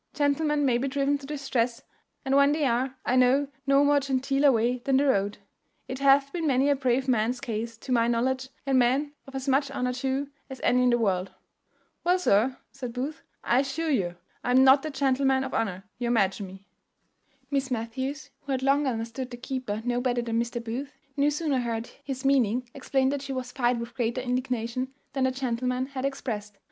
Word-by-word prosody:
Gentlemen 290 0 +1
may 245 -3 +3
be 270 - -1
driven 280 +1 +1
to 275 - -10
distress, 255 -5 -1 0.4
and 270 0 +2
when 280 +1 +5
they 305 -1 +1
are, 255 +1 0
I 250 - +2
know 260 +3 +4 0.2
no 275 +1 +5
more 290 0 +4
genteeler 275 +1 +2
way 240 +1 +1
than 265 +2 +1
the 285 - +3
road. 205 -6 +1 0.5
It 260 - -5
hath 275 0 +4
been 335 -3 -1
many 275 +1 +3
a - - +3
brave 260 0 0
man's 245 +1 +1
case, 230 -3 -4
to 255 - -8
my 235 -2 +3
knowledge, 260 +3 0 0.2
and 270 -2 +3
men 270 +4 +2
of 270 - -11
as 265 +1 -4
much 275 +1 +2
honour 250 -2 -1
too 270 +2 -2 0.2
as 265 -1 -8
any 250 - +4
in 250 - +4
the 240 - +4
world." 195 -5 0 0.7
"Well, 360 +1 +3
sir," 255 - +2
said 250 -4 -6
Booth, 275 +6 -4 0.2
"I 245 - +3
assure 280 +4 -1
you 180 -10 0 0.3
I - - -2
am 255 +1 +6
not 270 +1 +7
that 310 -1 -6
gentleman 265 -1 +2
of 265 - -5
honour 195 -4 -1 0.2
you 240 - -1
imagine 200 -4 +1
me." 190 +1 -13 0.9
Miss 275 -1 0
Matthews, 260 +4 -4
who 275 - -4
had 260 0 -1
long 280 +1 +3
understood 235 +1 -3
the 245 - -8
keeper 250 -4 -4
no 245 0 0
better 245 -1 0
than 230 0 0
Mr. 235 0 -4
Booth, 255 +5 -5 0.2
no 285 +1 +3
sooner 295 -2 0
heard 230 -1 -3
his 265 -1 -5
meaning 250 -3 +2
explained 270 -1 +1
than 285 - -1
she 275 0 -5
was 255 -1 -4
fired 245 -2 +1
with 235 +1 -6
greater 240 0 -1
indignation 250 0 -2 0.2
than 265 -1 +1
the 260 - +2
gentleman 255 0 -1
had 265 -1 -4
expressed. 215 -7 -4
260 Hz, 200 wpm, -27 LUFS, 240-275 Hz, 0.9 s, not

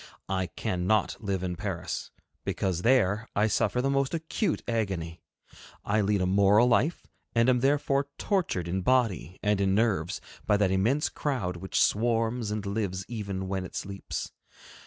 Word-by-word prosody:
I 95 -1 0
cannot 90 +5 0
live 100 -4 -2
in 90 -1 -2
Paris, - - -4 0.3
because 90 -3 -1
there 115 -2 +2
I 105 - +3
suffer 125 +3 +1
the 135 - +2
most 140 +3 +1
acute 165 +3 -1
agony. 95 -8 -2 0.6
I 105 +1 +2
lead 100 -1 +1
a - - +2
moral 100 +5 +5
life, 130 +7 +2 0.3
and 115 +1 +4
am 125 -1 +4
therefore 140 +1 +2
tortured 175 - 0
in 95 +2 -1
body 110 -6 +1
and 105 -1 +2
in 95 0 +2
nerves 100 -7 +1 0.3
by 105 - +4
that 100 -2 +2
immense 115 +11 +2
crowd 110 -12 -2
which 95 +2 -2
swarms 115 +1 +1
and 105 -1 -3
lives 100 -2 -2
even 100 -5 -4
when 95 0 -2
it 90 - -9
sleeps. 100 0 -5
105 Hz, 155 wpm, -28 LUFS, 95-120 Hz, 0.6 s, moral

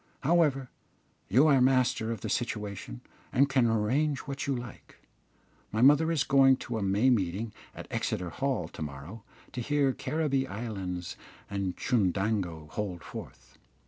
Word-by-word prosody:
However, 140 -5 +2 0.6
you 125 +10 +5
are 140 -4 +5
master 125 -3 +2
of 110 -4 -5
the 110 - -4
situation, 100 - -3 0.3
and 140 +3 +4
can 130 -3 +3
arrange 130 +7 +1
what 140 -1 -5
you 140 - +1
like. 120 -2 -9 0.8
My 110 +3 +1
mother 150 +4 +6
is 155 -4 +2
going 135 -2 +5
to 120 -3 -4
a - - -4
May 100 +6 +3
meeting 105 0 -1 0.2
at - - -8
Exeter 90 -2 -2
Hall 135 - -1
to - - -11
morrow 75 +9 -7 0.3
to 125 - -4
hear 140 +1 +1
Caribbee 140 -4 -1
Islands 95 -6 -5 0.3
and 100 -2 -2
Chundango 95 - 0
hold 95 -5 -4
forth. - - -10
115 Hz, 145 wpm, -29 LUFS, 100-135 Hz, 0.8 s, mother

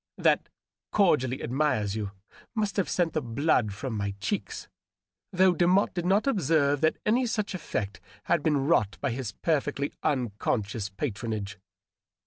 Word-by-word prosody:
That - - +2 0.2
" - - -66
cordially 145 - +2
admires 125 -6 0
you" 105 -2 -3 0.5
must 210 -2 0
have 195 - +1
sent 170 -3 +1
the 155 - 0
blood 125 -2 +1
from 115 +5 -5
my 100 -1 -2
cheeks, 105 - -3 0.6
though 185 0 +4
Demotte 180 +3 +3
did 175 -1 -2
not 195 +3 +3
observe 155 - +2
that 160 0 +3
any 240 +4 +3
such 210 -3 -2
effect 105 - -4 0.2
had 170 - +2
been 145 -3 +1
wrought 105 -11 +2
by - - -1
his 120 -4 -4
perfectly 145 -2 0
unconscious 110 -4 -1
patronage. 105 -2 -4
140 Hz, 145 wpm, -28 LUFS, 110-175 Hz, 0.6 s, though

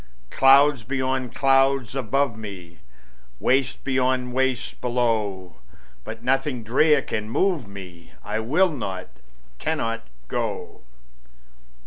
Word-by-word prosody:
Clouds 135 -1 +5
beyond 130 0 -2
clouds 135 -2 +3
above 135 0 0
me, 95 -7 -9 0.6
Wastes 130 0 +2
beyond 130 -1 0
wastes 130 -1 0
below; 110 -8 -1 0.5
But 115 - -8
nothing 135 -1 0
drear 140 +5 +3
can 110 0 -4
move 165 - 0
me; 90 -4 -11
I - - -2
will 155 +12 +2
not, 95 -10 -5 0.5
cannot 115 -8 -1 0.3
go. - - -4
125 Hz, 100 wpm, -24 LUFS, 110-135 Hz, 0.6 s, Clouds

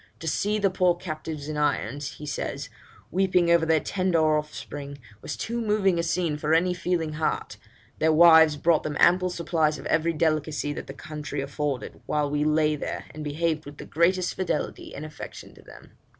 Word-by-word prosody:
To 165 - -6
see 205 +6 0
the 200 -2 +2
poor 180 -1 +3
captives 155 -4 -6
in 155 -1 -4
irons,' 145 -1 -1
he 150 - -9
says, 145 - -4 0.4
'weeping 180 -2 +2
over 170 -1 +4
their 160 -1 +4
tender 165 -4 +1
offspring, 145 -2 -5 0.2
was 155 - -5
too 235 +1 -3
moving 205 -5 +2
a - - +3
scene 170 -2 -1
for 150 +1 +1
any 180 +2 +2
feeling 170 -3 -1
heart, 155 +1 -2 0.4
Their 160 0 +3
wives 160 -1 +7
brought 160 +2 +3
them 150 -1 -4
ample 180 +1 +4
supplies 165 -3 0
of - - -10
every 165 +1 +1
delicacy 155 -2 0
that - - -7
the 135 - -8
country 150 -1 -6
afforded, 140 -1 -3
while 150 -1 0
we 150 0 +1
lay 155 0 +2
there, 145 - -5
and 155 0 -7
behaved 155 +1 -1
with 145 0 -10
the - - -8
greatest 180 +3 +1
fidelity 180 -5 -3
and 150 - -6
affection 155 -1 -9
to - - -16
them.' - - -15
155 Hz, 185 wpm, -26 LUFS, 150-175 Hz, 0.4 s, wives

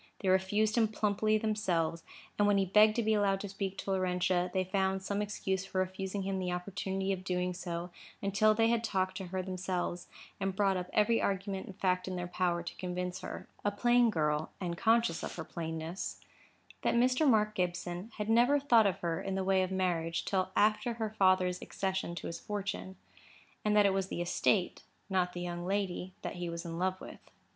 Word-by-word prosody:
They 190 - +1
refused 205 +4 +2
him 225 - +4
plumply 215 0 +1
themselves; 185 -7 0 0.4
and 205 - +5
when 205 -1 +4
he 195 - +3
begged 215 +3 +5
to 235 - +1
be 220 0 +2
allowed 200 -2 +2
to 205 - -5
speak 195 -1 -4
to 195 - -3
Laurentia, 180 -1 +1
they 185 -1 +1
found 190 0 0
some 200 +1 -1
excuse 190 -2 -2
for 190 - -6
refusing 190 +1 -2
him 190 0 -2
the 180 -1 -2
opportunity 190 +1 -2
of 190 - -4
so - - -13
doing, 180 -1 -1 0.7
until 200 +2 +3
they 225 +1 +3
had 235 -1 +1
talked 190 -4 0
to 190 - -5
her 185 +1 -3
themselves, 185 -1 -3 0.3
and 195 -1 -1
brought 195 -1 +2
up 180 0 -3
every 225 +2 +3
argument 195 0 -2
and 195 - -9
fact 185 -1 +1
in 185 - -3
their 180 0 -3
power 175 -1 0
to 170 - -7
convince 180 0 -3
her—a 205 - -5
plain 240 +3 +4
girl, 150 -4 0
and 175 -2 -3
conscious 225 -2 +2
of - - -5
her 160 - -4
plainness—that 165 +7 -5
Mr. 255 +5 +4
Mark 215 -2 +3
Gibson 180 +2 -3
had 210 -1 -3
never 240 +6 +4
thought 235 -6 +5
of 195 0 -2
her 165 -1 -1
in 195 -1 -3
the 190 - 0
way 190 0 +3
of 185 - 0
marriage 175 -3 -1
till 185 -1 0
after 215 +3 +3
her 220 -2 -3
father's 185 -3 +3
accession 190 -3 -2
to - - -6
his 170 - -5
fortune; 200 -2 -4 0.7
and 210 0 +2
that 205 - +6
it 195 - +4
was 195 -1 0
the 175 - -3
estate—not 180 0 0
the 175 - -5
young 175 -1 -4
lady—that 185 -1 -3
he 175 -1 -3
was 170 +1 -5
in 165 0 -5
love 185 +1 0
with. - - -10
190 Hz, 195 wpm, -32 LUFS, 180-210 Hz, 0.7 s, that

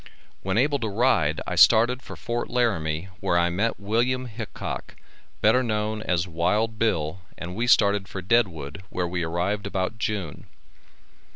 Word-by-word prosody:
When 95 +1 -1
able 140 +3 +2
to 115 -3 -2
ride 100 - +2
I - - -3
started 120 +3 +5
for - - -9
Fort 120 -1 -3
Laramie 95 -8 0
where 95 -3 +1
I 85 0 +2
met 105 +6 -1
Wm. 120 +5 0
Hickock, 115 -2 -6 0.5
better 110 +4 +4
known 110 -2 -1
as 90 -3 0
Wild 105 +7 0
Bill, 85 -6 0 0.2
and 90 +1 -6
we 120 +3 -1
started 100 -4 +4
for 95 - -6
Deadwood, 90 -7 0
where 90 -1 -2
we 90 0 -2
arrived 90 +5 -1
about 100 +3 -2
June. 100 -8 -3
105 Hz, 155 wpm, -25 LUFS, 90-115 Hz, 0.5 s, started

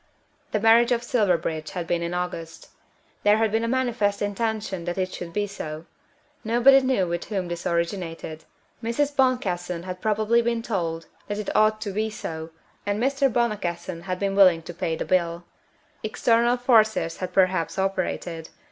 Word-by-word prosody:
The 215 - +1
marriage 225 +3 +5
of 240 -1 +1
Silverbridge 175 -10 0
had 175 -3 -3
been 170 0 -1
August. 175 -2 -5 0.5
There 210 +1 +4
had 220 -1 +1
been 225 +1 +1
a - - 0
manifest 230 -5 0
intention 205 -3 -2
that 175 +1 -3
it 185 -1 -1
should 170 -1 -6
be 205 +3 0
so. 160 -5 -7 0.6
Nobody 245 +4 +6
knew 260 -8 +1
with 170 0 -3
whom 190 -4 -3
this 175 0 -4
originated. 170 -2 -3 0.4
Mrs. 280 +5 -1
Boncassen 180 -10 0
had 185 0 -6
probably 220 +2 +2
been 235 -1 -1
told 165 -7 -2 0.2
that 205 - -3
it 210 - -4
ought 215 0 +4
to 210 -2 -3
be 215 +3 -1
so, 160 -6 -6 0.3
and 205 0 -1
Mr. 275 +2 +2
Boncassen 185 -7 -2
had 185 0 -3
been 195 0 -1
willing 185 -4 +6
to 175 - -8
pay 165 -1 -2
the - - -4
bill. 170 -2 0 0.6
External 235 +2 +2
forces 220 -8 +3
had 185 -1 -4
perhaps 185 -2 +2
operated. 185 -4 -2
200 Hz, 165 wpm, -25 LUFS, 175-225 Hz, 0.6 s, Nobody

